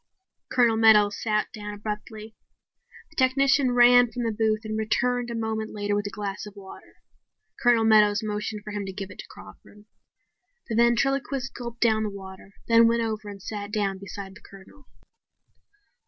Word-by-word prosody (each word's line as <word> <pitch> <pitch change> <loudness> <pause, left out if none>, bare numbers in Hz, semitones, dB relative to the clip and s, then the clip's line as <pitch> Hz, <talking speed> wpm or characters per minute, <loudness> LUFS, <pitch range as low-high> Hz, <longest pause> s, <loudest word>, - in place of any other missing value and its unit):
Colonel 235 -3 +3
Meadows 210 -2 +5
sat 215 -1 -1
down 210 -1 -7
abruptly. 215 +1 -7 0.8
The - - -21
technician 270 0 +3
ran 245 0 +6
from 240 +2 -4
the 230 - 0
booth 215 0 0
and 215 0 -4
returned 240 +3 0
a 235 - -4
moment 220 -1 -3
later 205 0 -1
with 205 0 -2
a - - -4
glass 205 0 -5
of 205 - -12
water. 195 -1 -13 0.7
Colonel 240 -2 +4
Meadows 210 -1 +4
motioned 210 0 -4
for 210 - -8
him 205 -1 -4
to 190 - -6
give 195 0 -7
it - - -14
to - - -8
Crawford. 210 0 -15 0.8
The 225 - -2
ventriloquist 265 +3 +1
gulped 235 -1 -8
down 220 -2 +3
the 215 - -1
water, 190 0 -11
then 230 0 +6
went 230 0 +1
over 215 -2 -4
and 200 -1 -10
sat 205 -1 -6
down 200 -2 -1
beside 195 0 -8
the 205 - -16
Colonel. 200 +8 -17
215 Hz, 170 wpm, -25 LUFS, 205-235 Hz, 0.8 s, ran